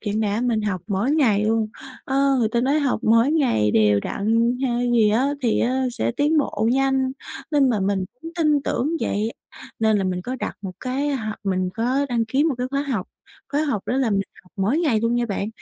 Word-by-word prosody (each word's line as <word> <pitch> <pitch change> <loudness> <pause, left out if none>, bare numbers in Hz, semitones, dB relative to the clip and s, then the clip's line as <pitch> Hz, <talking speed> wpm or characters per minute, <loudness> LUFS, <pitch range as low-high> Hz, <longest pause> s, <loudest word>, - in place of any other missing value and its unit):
chẳng 215 0 -2
đã 210 +1 0
mình 235 -3 0
học 190 -4 -2
mỗi 205 +6 0
ngày 220 -9 +3
luôn. 220 0 +1 0.4
Ơ, 275 0 +2
người 225 -3 +2
ta 235 +1 0
nói 275 +4 +2
học 275 -5 0
mỗi 230 +6 +4
ngày 240 - +2
đều 105 -2 +3
đặn 230 - 0
hay 245 -1 0
gì 220 -3 +4
á 265 +6 +1
thì 230 - +2
á 260 +2 +1
sẽ 115 - -1
tiến 300 +2 +2
bộ 225 -6 0
nhanh, 265 -1 +1 0.4
nên 280 -4 +3
mà 210 -4 0
mình 190 -1 0 0.2
cũng 330 - -6
tin 305 -4 +2
tưởng 270 +2 -1
vậy, 215 +2 -1 0.5
nên 220 -1 +3
là 195 - -1
mình 180 -1 -2
có 255 +4 -4
đặt - - -5
một 190 -2 -5
cái 270 +3 -1
h 235 - -6 0.2
mình 185 -1 0
có 255 +5 0
đăng 235 -2 0
ký 265 +7 +1
một 310 -5 +1
cái 250 - -1
khóa 280 0 0
học, 250 -10 -3 0.4
khóa 295 +2 +1
học 260 -10 -1
đó 250 - 0
là 260 -5 +1
mình 195 -1 +2 0.2
học 180 - -25
mỗi 205 +10 +1
ngày 285 -11 +2
luôn 230 +1 +1
nha 240 0 0
bạn. 200 0 -3
235 Hz, 225 wpm, -22 LUFS, 210-270 Hz, 0.5 s, mỗi